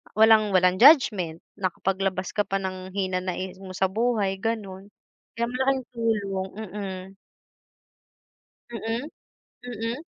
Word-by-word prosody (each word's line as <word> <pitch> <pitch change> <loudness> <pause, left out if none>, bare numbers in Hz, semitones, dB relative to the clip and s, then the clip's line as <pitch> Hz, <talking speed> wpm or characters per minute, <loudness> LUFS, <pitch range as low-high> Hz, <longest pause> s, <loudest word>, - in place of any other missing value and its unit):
walang 215 -2 +5
walang 185 0 +4
judgment, 210 - +5 0.2
nakapaglabas 190 0 -1
ka 205 - 0
pa 195 - -2
ng 185 0 -6
hinanaing 185 -1 -2
mo 185 -1 -9
sa 190 +1 +1
buhay, 210 -3 0
gano'n. 200 -3 -4 0.5
Kaya 235 0 0
malaking 265 +1 +1
tulong 205 -5 -1
mm. 195 -3 -6 1.7
Mm? 230 +1 -3 0.6
Mm? 240 +4 -4
195 Hz, 105 wpm, -25 LUFS, 185-230 Hz, 1.7 s, walang